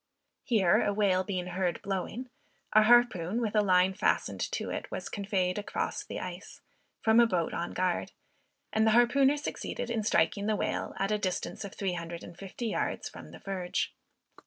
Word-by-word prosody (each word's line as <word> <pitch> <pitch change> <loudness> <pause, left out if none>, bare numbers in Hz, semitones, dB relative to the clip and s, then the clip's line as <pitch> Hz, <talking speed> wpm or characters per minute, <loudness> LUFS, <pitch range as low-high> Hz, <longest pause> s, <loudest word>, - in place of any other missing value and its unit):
Here 200 -8 +3
a 205 - +1
whale 200 -3 +2
being 185 -2 -3
heard 180 -1 -1
blowing, 200 +6 -4 0.4
a 215 - +8
harpoon, 220 -4 +4
with 220 -3 -2
a 210 - +5
line 185 -1 +4
fastened - - 0
to - - -2
it, - - -4
was - - -5
conveyed 195 -2 -1
across 205 - -3
the - - -6
ice, - - -8 0.4
from 220 +1 +5
a 235 - +7
boat 175 -6 0
on 170 - -3
guard, 180 -1 -1 0.6
and 220 0 +3
the 220 - +5
harpooner 270 +4 +4
succeeded 285 -4 -4
in 230 -2 0
striking 205 -1 +1
the 215 - +2
whale, - - -2
at 195 +1 0
the 210 0 +1
distance 185 0 -3
of 200 - -8
three 195 -3 -1
hundred 170 -1 -6
and 175 - -10
fifty 195 +6 -7
yards 225 - -2
from - - -11
the - - -11
verge. 185 -2 -3
200 Hz, 185 wpm, -30 LUFS, 180-220 Hz, 0.6 s, a